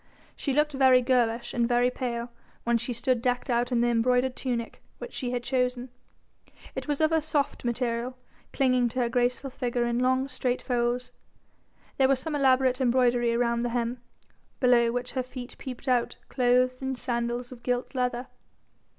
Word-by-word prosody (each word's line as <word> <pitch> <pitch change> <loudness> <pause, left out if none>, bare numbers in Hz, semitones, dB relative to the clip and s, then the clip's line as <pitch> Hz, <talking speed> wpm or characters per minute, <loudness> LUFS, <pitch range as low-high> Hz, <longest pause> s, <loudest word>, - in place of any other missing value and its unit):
She 280 - -2
looked 300 +2 +2
very 260 -2 +5
girlish 240 -2 +1
and 235 -1 +1
very 245 +1 +3
pale 240 -2 -4 0.3
when 235 0 +2
she 235 +2 -4
stood 240 +1 0
decked 250 +1 0
out 240 +1 +1
in 240 -1 +2
the 240 - +3
embroidered 250 +2 +2
tunic 240 -3 -3 0.2
which - - -8
she 250 - -3
had 245 -1 -2
chosen; 250 0 -1 0.8
it - - -5
was 290 0 -1
of 315 0 +3
a 320 -1 +3
soft 295 -2 -1
material, 240 +1 -2 0.3
clinging 255 -3 +2
to 255 +3 -4
her 240 - +1
graceful 250 +2 0
figure 245 -2 -1
in 235 0 0
long 260 +1 +2
straight 255 -1 -1
folds, 245 0 -1 0.9
there 265 - +5
was 270 -1 +2
some 300 +3 -3
elaborate 260 -2 +3
embroidery 240 -2 +3
round 235 -1 +1
the 240 - 0
hem, 240 0 -2 0.6
below 240 -2 +4
which 245 +1 -3
her 260 - -1
feet 255 -1 -8
peeped 260 0 -8
out 245 -2 +1
clothed 255 0 +2
in 265 0 -2
sandals 240 0 -2
of 245 -2 -11
gilt 245 +2 -2
leather. 250 -1 -1
250 Hz, 175 wpm, -27 LUFS, 240-260 Hz, 0.9 s, very